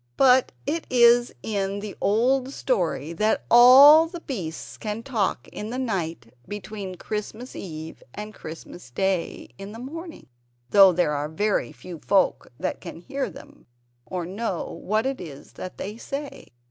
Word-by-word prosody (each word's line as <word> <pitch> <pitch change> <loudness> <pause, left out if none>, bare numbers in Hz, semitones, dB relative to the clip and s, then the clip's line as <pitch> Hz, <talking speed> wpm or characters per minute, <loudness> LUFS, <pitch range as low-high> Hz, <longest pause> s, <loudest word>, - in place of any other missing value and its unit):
But 260 -1 +5
it 330 +1 -2
is 240 -1 +5
in 200 -2 -2
the 205 -1 -7
old 255 +5 +2
story 170 - -1
that 215 +6 0
all 275 +7 +9
the 340 0 -9
beasts 180 - -6
can 215 +1 -4
talk 225 -8 -1
in 210 - -6
the 250 - -4
night 170 - -3
between 205 -2 -6
Christmas 215 +6 -6
Eve 160 -3 -8
and 210 +1 -7
Christmas 160 -3 -10
Day 185 +6 -2
in 195 +1 -8
the - - -8
morning 320 +7 -8 0.5
(though 195 -2 +8
there 175 -3 +1
are 145 +1 -2
very 180 - 0
few 165 +7 -10
folk 195 +3 +1
that 185 - -3
can 170 -2 -9
hear 270 +3 -3
them, 175 - -15 0.4
or 180 -2 -4
know 195 0 -4
what 215 +4 0
it 270 -4 -2
is 145 -5 -10
that 185 - -8
they 210 +3 -6
say). 280 +4 -6
210 Hz, 155 wpm, -25 LUFS, 180-250 Hz, 0.5 s, all